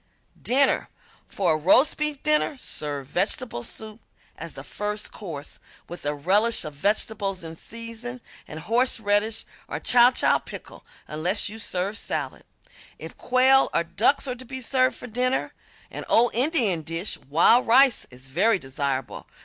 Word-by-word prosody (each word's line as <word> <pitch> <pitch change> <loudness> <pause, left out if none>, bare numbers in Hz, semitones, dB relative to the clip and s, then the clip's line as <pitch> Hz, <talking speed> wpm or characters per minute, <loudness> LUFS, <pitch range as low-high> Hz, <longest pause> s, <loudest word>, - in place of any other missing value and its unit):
~Dinner~ 270 +3 +2 0.4
For 180 -5 0
a - - 0
roast 195 - +4
beef 300 -2 -1
dinner 300 -1 +1
serve 145 - -4
vegetable 195 - -2
soup 215 - -8 0.3
as - - -8
the - - -8
first 210 0 -4
course, 160 -8 -8 0.3
with 175 -4 -7
a 145 - -1
relish 205 +10 +2
of 155 - -7
vegetables 200 +3 -1
in 165 0 -8
season 230 +5 -7 0.3
and 155 +1 -8
horseradish 220 0 +1 0.2
or - - -4
chow 245 0 +5
chow - - +2
pickle, - - -11 0.2
unless 175 +8 -1
you 220 +2 -8
serve 195 0 -2
salad. - - -4 0.5
If - - -9
quail 260 +2 +4
or - - +3
ducks 235 +12 +1
are 255 - -1
to 250 +1 -10
be 260 +1 -7
served 255 +1 +2
for - - -10
dinner, 250 +2 -1 0.4
an - - -6
old 240 +1 +4
Indian 240 - +2
dish, 165 +5 -2
wild 170 - +3
rice, 260 +2 +5
is 125 +1 -12
very 195 +11 +2
desirable. 135 -3 -4
215 Hz, 150 wpm, -24 LUFS, 165-250 Hz, 0.5 s, chow